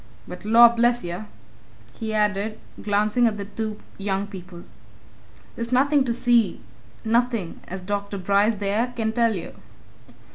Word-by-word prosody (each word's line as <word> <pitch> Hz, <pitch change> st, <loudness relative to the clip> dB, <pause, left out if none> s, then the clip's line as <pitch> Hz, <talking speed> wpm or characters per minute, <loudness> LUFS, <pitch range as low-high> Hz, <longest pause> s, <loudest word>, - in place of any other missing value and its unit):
But 180 Hz, +2 st, -9 dB
lor' 235 Hz, +2 st, +8 dB
bless 240 Hz, +1 st, +2 dB
yer!" 175 Hz, +5 st, -5 dB, 0.7 s
he 220 Hz, +8 st, -5 dB
added, 210 Hz, 0 st, 0 dB, 0.2 s
glancing 210 Hz, +3 st, +2 dB
at 215 Hz, -2 st, -1 dB
the 200 Hz, -, -5 dB
two 215 Hz, +1 st, -5 dB, 0.2 s
young 195 Hz, 0 st, -1 dB
people. 185 Hz, -3 st, -10 dB, 0.9 s
"There's 235 Hz, +1 st, -5 dB
nothing 275 Hz, +2 st, +3 dB
to 240 Hz, -, -1 dB
see 235 Hz, -5 st, +2 dB, 0.5 s
nothing! 230 Hz, -5 st, 0 dB
as 190 Hz, +1 st, -6 dB
Dr. 200 Hz, +1 st, -3 dB
Bryce 200 Hz, +4 st, +2 dB
there 210 Hz, +5 st, -1 dB
can 220 Hz, -1 st, -1 dB
tell 230 Hz, -2 st, +2 dB
you." 175 Hz, -, -6 dB
215 Hz, 140 wpm, -24 LUFS, 200-235 Hz, 0.9 s, lor